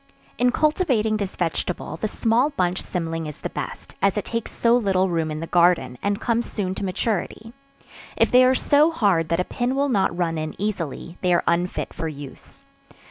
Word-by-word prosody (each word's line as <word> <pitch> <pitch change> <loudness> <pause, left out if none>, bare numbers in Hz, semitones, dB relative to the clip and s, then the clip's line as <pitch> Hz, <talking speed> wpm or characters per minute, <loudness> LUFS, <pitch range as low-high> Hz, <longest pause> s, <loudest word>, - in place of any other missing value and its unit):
In 245 0 +4
cultivating 255 - +1
this 200 -2 -4
vegetable, 175 0 -2
the 215 - -2
small 230 +6 +2
bunch 185 -9 -1
cymling 165 -2 -3
is 150 - -9
the - - -4
best, - - -6
as 200 +1 +2
it 210 - -2
takes 230 -1 -3
so 235 0 +3
little 190 -5 +2
room 165 -2 0
in 155 0 -4
the - - -3
garden, 170 -7 +3
and 200 0 0
comes 235 0 -1
soon 190 -3 -2
to 190 - -5
maturity; 215 +3 -2 0.6
if - - +3
they 250 +1 +7
are 255 +1 +4
so 295 +4 +4
hard 195 - +1
that 170 0 +1
a - - +2
pin 245 +6 -2
will 280 +1 +1
not 190 -7 +1
run 165 -3 0
in 155 +1 -5
easily, 175 -4 -4
they 180 - +1
are 175 - +3
unfit 175 +2 -1
for 165 -1 -4
use. 145 -3 -10
190 Hz, 195 wpm, -23 LUFS, 170-230 Hz, 0.6 s, they